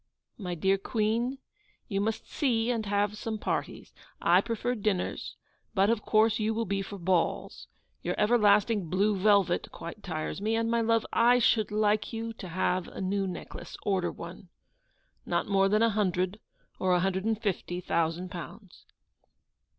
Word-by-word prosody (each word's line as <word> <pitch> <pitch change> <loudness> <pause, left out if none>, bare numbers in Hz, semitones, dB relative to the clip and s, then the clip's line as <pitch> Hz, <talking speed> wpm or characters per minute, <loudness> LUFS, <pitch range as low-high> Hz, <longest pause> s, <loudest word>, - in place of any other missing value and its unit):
My 180 -4 -3
dear 190 +3 +2
Queen, 230 +5 0 0.5
you 200 -3 -1
must 220 +1 -2
see 240 -5 +1
and 225 -3 -2
have 205 +1 +1
some 220 +1 -4
parties. - - -3 0.3
I - - +5
prefer 230 +1 -2
dinners, 210 -5 -2 0.4
but 195 +2 +4
of 230 -2 0
course 220 +1 +3
you 215 +1 0
will 230 0 0
be 195 +1 -1
for 200 +1 -7
balls. 180 -1 -1 0.3
Your - - -2
everlasting 210 -3 +3
blue 200 +4 +2
velvet 195 -2 +3
quite 170 +5 -8
tires 160 0 -4
me: 220 +2 +1
and, 230 0 0
my 235 0 +2
love, 230 0 +2
I 240 +2 +5
should 225 -2 +3
like 210 0 +1
you 225 0 -4
to 195 - -9
have 180 +1 0
a - - -9
new 195 +1 0
necklace. 180 - -7
Order 190 -3 0
one. 175 +2 -10 0.7
Not - - 0
more 195 -1 +3
than 215 +2 +3
a 230 - +5
hundred 185 -1 0 0.4
or 185 -1 +2
a - - +3
hundred 190 0 0
and 220 -1 0
fifty 190 -4 -2
thousand 170 +1 -1
pounds. 180 +2 -10
205 Hz, 165 wpm, -29 LUFS, 185-225 Hz, 0.7 s, I